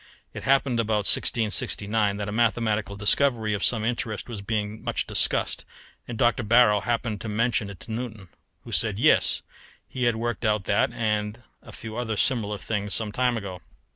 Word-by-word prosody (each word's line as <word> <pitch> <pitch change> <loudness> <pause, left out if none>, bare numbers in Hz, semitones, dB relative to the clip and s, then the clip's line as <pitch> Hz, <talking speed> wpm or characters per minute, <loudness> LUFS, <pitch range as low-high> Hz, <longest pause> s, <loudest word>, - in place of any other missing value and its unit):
It - - -7
happened, 135 -3 +2
about 110 -2 0
1669, 105 -2 +2
that 105 0 -4
a - - -3
mathematical 110 -2 0
discovery 110 +1 +1
of 100 - -2
some 110 -3 +2
interest 115 -3 -3
was 115 -5 -6
being 105 +1 -3
much - - -2
discussed, - - +1 0.4
and 120 - -6
Dr. 120 +3 +2
Barrow 110 -2 +5
happened 115 -2 -2
to 110 - -5
mention 115 -1 0
it 95 -4 -11
to - - -9
Newton, 110 -5 -6 0.3
who - - -10
said - - 0
yes, - - +3 0.4
he 125 -1 -3
had 120 -1 +2
worked 115 0 -3
out 105 -3 +1
that 100 +4 +1
and 110 -1 -2 0.2
a - - -13
few 110 0 -8
other 115 -3 -2
similar 110 -5 +1
things 105 0 -2
some 110 -2 -1
time 125 +1 +1
ago. 95 -4 -7
110 Hz, 175 wpm, -25 LUFS, 105-120 Hz, 0.4 s, Barrow